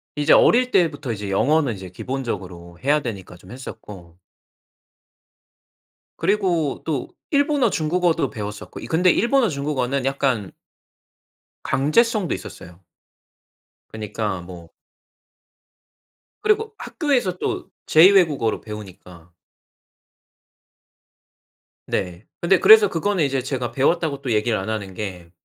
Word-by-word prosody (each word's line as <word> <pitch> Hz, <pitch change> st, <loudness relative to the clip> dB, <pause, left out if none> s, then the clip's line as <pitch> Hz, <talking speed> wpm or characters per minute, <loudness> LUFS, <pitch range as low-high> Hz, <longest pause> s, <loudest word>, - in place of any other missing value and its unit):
이제 150 Hz, 0 st, +3 dB
어릴 250 Hz, +1 st, +5 dB
때부터 155 Hz, -8 st, +1 dB
이제 105 Hz, -1 st, -6 dB
영어는 135 Hz, +7 st, +2 dB
이제 95 Hz, -1 st, -9 dB
기본적으로 90 Hz, -7 st, -6 dB
해야 145 Hz, +3 st, +3 dB
되니까 100 Hz, -8 st, -7 dB
좀 90 Hz, +3 st, -16 dB
했었고 95 Hz, -9 st, -11 dB, 2.0 s
그리고 175 Hz, -8 st, 0 dB
또 145 Hz, -6 st, -2 dB, 0.2 s
일본어, 285 Hz, -4 st, +2 dB
중국어도 170 Hz, 0 st, 0 dB
배웠었고 105 Hz, -3 st, -7 dB
이 -, -, -8 dB
근데 175 Hz, +7 st, +3 dB
일본어 240 Hz, +4 st, +2 dB
중국어는 140 Hz, -3 st, -2 dB
약간 135 Hz, -7 st, -1 dB, 1.1 s
강제성도 205 Hz, -, +1 dB
있었어요. 85 Hz, 0 st, -11 dB, 1.1 s
그니까 105 Hz, -3 st, -4 dB
뭐 85 Hz, -2 st, -11 dB, 1.7 s
그리고 430 Hz, +1 st, +1 dB
학교에서 255 Hz, -, -1 dB
또 -, -, -4 dB, 0.2 s
제 155 Hz, -, +7 dB
2 190 Hz, -, +8 dB
외국어로 155 Hz, -, +2 dB
배우니까. 90 Hz, -5 st, -11 dB, 2.6 s
네. 90 Hz, +2 st, -3 dB, 0.2 s
근데 180 Hz, +2 st, +3 dB
그래서 215 Hz, -1 st, +8 dB
그거는 185 Hz, +1 st, 0 dB
이제 135 Hz, -2 st, 0 dB
제가 125 Hz, -2 st, -3 dB
배웠다고 140 Hz, +2 st, 0 dB
또 130 Hz, -3 st, -3 dB
얘기를 110 Hz, +1 st, +1 dB
안 95 Hz, +3 st, -4 dB
하는 100 Hz, -3 st, -4 dB
게 90 Hz, -4 st, -7 dB
135 Hz, 255 characters per minute, -22 LUFS, -, 2.6 s, 2